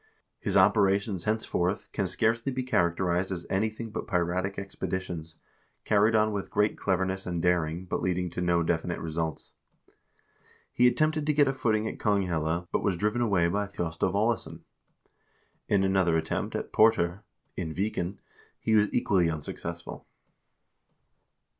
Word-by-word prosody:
His - - 0
operations 100 -2 +3
henceforth 105 -3 -1
can 100 -3 -1
scarcely 115 +7 0
be 130 0 -2
characterized 90 -5 +1
as 85 -2 -4
anything 110 +3 -1
but - - -5
piratic 90 +2 -1
expeditions, 90 -4 -5 0.5
carried 105 +1 +3
on 110 0 +3
with 100 -2 -4
great 105 +1 +1
cleverness 95 0 -1
and 85 -1 -2
daring, 85 0 0
but - - -2
leading 90 -1 -1
to 90 - -4
no 85 -1 +2
definite 85 +1 -1
results. 80 -1 -4 1.2
He 125 - +5
attempted 155 +3 +1
to 150 - +3
get 145 -1 +4
a 135 - +1
footing 110 -4 0
at - - -6
Konghelle, 90 -5 0
but - - 0
was 95 -4 0
driven 105 +5 0
away 95 -7 +3
by 100 +4 -1
Thjostolv 90 -1 -2
Aalesson. 110 +3 0 1.1
In 100 -2 +3
another 95 -4 +3
attempt 80 0 -2
at - - -4
Port0r, 100 -4 +3 0.3
in 80 - -3
Viken, 95 +1 -2 0.4
he 110 - 0
was 105 -1 +4
equally 95 -8 +2
unsuccessful. 80 -2 -6
95 Hz, 140 wpm, -28 LUFS, 85-110 Hz, 1.2 s, He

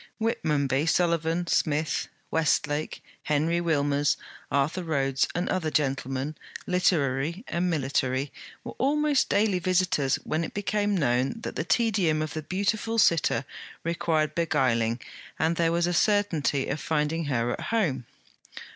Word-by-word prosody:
Whitmonby, 150 - 0
Sullivan 170 0 +1
Smith, 155 -2 0 0.2
Westlake, 150 -1 0 0.2
Henry 160 +3 +1
Wilmers, 145 -3 +1 0.3
Arthur 145 +6 0
Rhodes, 135 -5 +1
and 175 +1 -1
other 175 -4 0
gentlemen, 135 -1 -1 0.3
literary 165 - +1
and 175 +1 0
military, 135 -3 0 0.3
were - - -7
almost 295 +1 +2
daily 200 -2 +2
visitors 180 -6 +1
when 160 +2 -1
it - - -6
became 205 0 0
known 130 - +1
that - - -5
the - - -1
tedium 175 -4 +2
of 155 - -5
the 155 - -3
beautiful 205 +7 -1
sitter 170 -7 +3 0.4
required 160 -2 0
beguiling 125 -8 +1 0.4
and 160 +1 +1
there 165 0 +2
was 170 0 +2
a 175 - 0
certainty 170 -8 +2
of 140 - -2
finding 160 +1 -1
her 120 -4 0
at - - -4
home. 155 - 0
160 Hz, 130 wpm, -27 LUFS, 140-180 Hz, 0.4 s, sitter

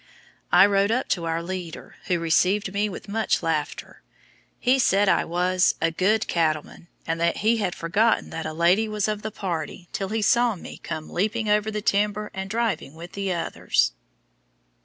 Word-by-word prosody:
I 180 +2 +8
rode 200 0 +2
up 250 +3 0
to 170 -3 0
our 165 0 -1
leader, 180 -2 -7
who 180 - +2
received 185 +4 +1
me 205 +1 0
with 190 - -8
much 215 -2 0
laughter. 160 -3 -3 0.6
He 260 +2 +3
said 205 -4 +3
I - - +3
was 180 +2 +2
"a 165 0 +1
good 205 +6 +1
cattleman," 160 0 -1 0.2
and 165 +1 -2
that 170 0 +1
he 230 +1 +4
had 195 -5 -1
forgotten 205 +8 +1
that 160 - -4
a - - -4
lady 175 +7 +2
was 210 -1 -1
of 210 -1 -2
the 215 - -4
party 175 -3 -5
till 195 -1 -3
he 220 0 -1
saw 235 +1 +3
me 175 - -10
"come 155 0 -5
leaping 215 +3 -1
over 210 +1 +2
the 210 -1 -4
timber, 210 +1 0
and 190 0 -5
driving 220 -9 -2
with 170 +2 -10
the 195 -1 -3
others." 170 -2 0
195 Hz, 180 wpm, -24 LUFS, 170-210 Hz, 0.6 s, I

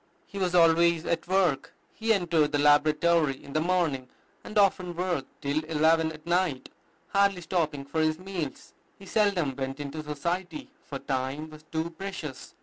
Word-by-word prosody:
He 200 - -8
was 180 -2 0
always 170 -1 +4
at 170 - -1
work. 180 -7 +1 0.2
He 225 0 -1
entered 165 -7 +2
the - - +3
laboratory 150 +1 +4
in 140 - -10
the 155 - +1
morning, 160 -7 0 0.3
and 215 - -6
often 185 -3 +2
worked 175 -6 -1 0.2
till 145 +2 0
eleven 160 +1 +3
at 155 -1 -12
night, 170 -6 0 0.4
hardly 200 -2 +2
stopping 155 -5 -1
for 160 +3 -1
his 155 0 +1
meals. 180 -6 -6 0.2
He 195 - -13
seldom 190 -10 +1
went 135 +1 -4
into 145 +2 -5
society, 165 +3 -4
for 140 - -6
time 135 +3 -3
was 155 0 -12
too 160 +1 -2
precious. 170 -6 -7
160 Hz, 160 wpm, -28 LUFS, 145-180 Hz, 0.4 s, always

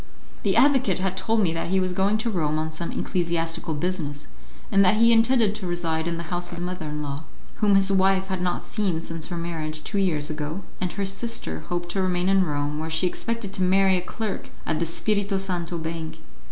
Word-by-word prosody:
The - - +1
advocate 260 -9 +4
had 190 0 -1
told 220 +4 +1
me 170 -5 +2
that 165 +1 -2
he 190 +1 +3
was 185 -1 0
going 195 +3 +2
to 225 +2 -1
Rome 155 -5 0
on 160 0 -2
some 165 +2 -4
ecclesiastical 170 -2 -1
business, 150 -3 -2 0.5
and 195 0 +6
that 185 +2 +5
he 230 +2 +5
intended 225 -2 +4
to 210 -4 -5
reside 165 -2 -1
in 170 -1 -1
the 170 - -4
house 175 0 -1
of 175 - -6
his 175 - -3
mother 180 -3 -4
in 150 0 -3
law, 145 +2 -5 0.3
whom 205 -2 +4
his 195 0 +5
wife 190 0 +3
had 190 -1 -2
not 180 -1 -1
seen 185 -7 -1
since 165 -2 -5
her 175 - -4
marriage, 155 -2 -4
two 200 - -1
years 155 -6 +1
ago, 155 +4 -4 0.2
and 180 -1 -1
her 200 0 -1
sister 195 - -2
hoped 175 0 -2
to 190 +2 0
remain 180 0 +1
in 195 -1 +5
Rome, 145 -1 -2
where 160 +1 -3
she 160 +3 +2
expected 230 +2 -2
to 190 - -2
marry 190 +1 +4
a 180 - 0
clerk 215 +2 -4 0.2
at 155 - 0
the 170 - 0
Spirito 200 +3 +1
Santo 180 -3 -2
Bank. 160 0 -5
180 Hz, 220 wpm, -25 LUFS, 165-195 Hz, 0.5 s, and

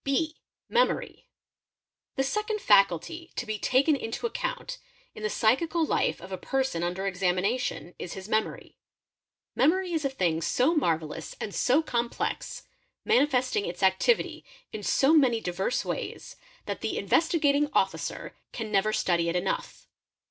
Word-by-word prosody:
| - - -61
(b) 310 +3 0 0.3
Memory™. - - 0 0.9
The 270 - +1
second 425 +9 -1
faculty 205 - +2
to - - -3
be 215 -2 -3
taken 275 +7 +3
into 225 - -4
account - - -3 0.3
in - - -10
the 215 - -1
psychical 320 +11 +2
lif - - 0
of 185 +2 -11
a 185 - -4
person 265 -10 -1
under 180 +3 -2
examination 185 +1 -1
is 175 - -5
his 190 0 -8
memory. 220 0 -2 0.8
Memory 355 +5 +2
is 320 -2 0
a 275 - +1
thing 180 -11 0
s 165 - -2 0.2
marvellous 160 - -1
and 205 - -5
so 290 +6 +3
complex, 235 -5 -2 0.4
manifesting 260 - +2
its 175 +3 -5
activity 190 - +2 0.3
in 215 - -5
so 270 +8 +3
many 260 -7 +4
divers 195 +7 -2
ways, - - -5 0.3
that - - -4
the - - -2
Investigating 295 -3 +2
Officer - - -1 0.2
can 220 -2 -5
never 205 +2 +2
study 170 -4 +1
it 170 - -2
enough. 180 +2 -2
245 Hz, 145 wpm, -27 LUFS, 190-310 Hz, 0.9 s, many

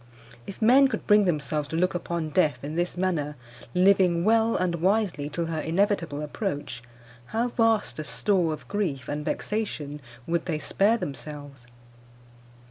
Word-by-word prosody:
If 200 - -6
men 265 +5 +7
could 260 - -4
bring 210 -1 +5
themselves 150 -3 -1
to 160 - -4
look 180 +3 +1
upon 170 -2 -3
death 155 -4 +1
in 150 +2 -5
this 175 +1 -1
manner, 165 -6 -1 0.4
living 180 -2 +4
well 225 +1 +3
and 180 -1 0
wisely 190 -6 +1
till 170 +3 -2
her 165 -1 -3
inevitable 165 -4 0
approach, 145 - -4 0.5
how 235 +2 -1
vast 225 -7 +1
a - - -2
store 180 0 +1
of 155 - -7
grief 165 - -2
and 150 +1 -3
vexation 150 -8 -3 0.2
would 170 0 -1
they 160 -3 0
spare 205 +8 +2
themselves! 145 - -8
170 Hz, 150 wpm, -26 LUFS, 150-205 Hz, 0.5 s, men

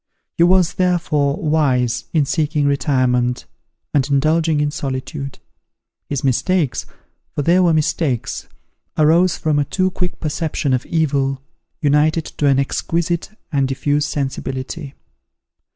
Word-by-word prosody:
He - - -1
was, 180 -1 +4
therefore, 165 -6 +1
wise, 140 - +1
in 155 -4 +2
seeking 150 0 0
retirement, 130 -4 +1 0.5
and 140 -1 +2
indulging 155 +2 +2
in 145 0 +1
solitude. 140 0 -5 0.7
His 140 -3 -2
mistakes, 140 +3 +1 0.5
for 145 - -1
they 175 +5 +4
were 180 -2 +4
mistakes, 155 - -1 0.5
arose 165 +3 +4
from 155 -2 +1
a - - +3
too 185 +3 0
quick 180 -1 -3
perception 150 -3 -1
of 125 - -1
evil, 140 -4 0 0.4
united 150 +2 +3
to 145 - +3
an 135 -1 +4
exquisite 165 +5 -1 0.2
and 140 -3 +1
diffuse 145 +2 0
sensibility. 135 +1 -4
150 Hz, 120 wpm, -19 LUFS, 135-165 Hz, 0.7 s, was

